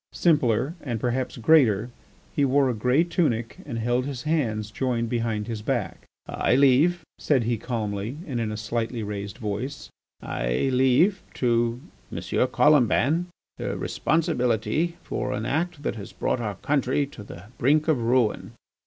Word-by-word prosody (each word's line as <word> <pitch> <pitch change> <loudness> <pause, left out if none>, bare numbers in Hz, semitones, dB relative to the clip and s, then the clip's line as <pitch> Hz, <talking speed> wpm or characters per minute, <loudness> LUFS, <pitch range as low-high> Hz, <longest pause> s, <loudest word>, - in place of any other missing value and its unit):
Simpler, 135 -4 +2
and 120 -6 -3
perhaps 125 +3 -2
greater, 120 -5 +4 0.4
he 145 - +2
wore 135 -1 +3
a - - -2
grey 125 +8 +2
tunic 140 -10 -1
and 115 - -4
held 120 +3 0
his 135 -3 -5
hands 115 -10 -1
joined 120 -1 -1
behind 115 -3 -1
his 110 -2 -5
back. 120 -2 -3 0.2
"I - - +1
leave," 140 +6 +4 0.2
said 135 -5 +2
he 115 -1 -1
calmly 110 0 -3
and 130 -5 -3
in 110 -2 -1
a 105 - -4
slightly 115 +1 -3
raised 100 0 -5
voice, 120 +5 -4 0.3
"I - - -1
leave 135 +10 +3
to 120 0 +1 0.3
M. - - -5 0.3
Colomban 150 +3 +3 0.3
the - - -3
responsibility 155 - 0
for - - -3
an 105 +2 -3
act 160 +2 -2
that - - -2
has 100 - -9
brought - - -1
our 105 -4 -3
country 140 +4 0
to 135 -6 -12
the 85 -3 -10 0.2
brink 150 +5 +3
of 150 -7 +2
ruin. 120 -1 +1
125 Hz, 155 wpm, -25 LUFS, 110-145 Hz, 0.4 s, greater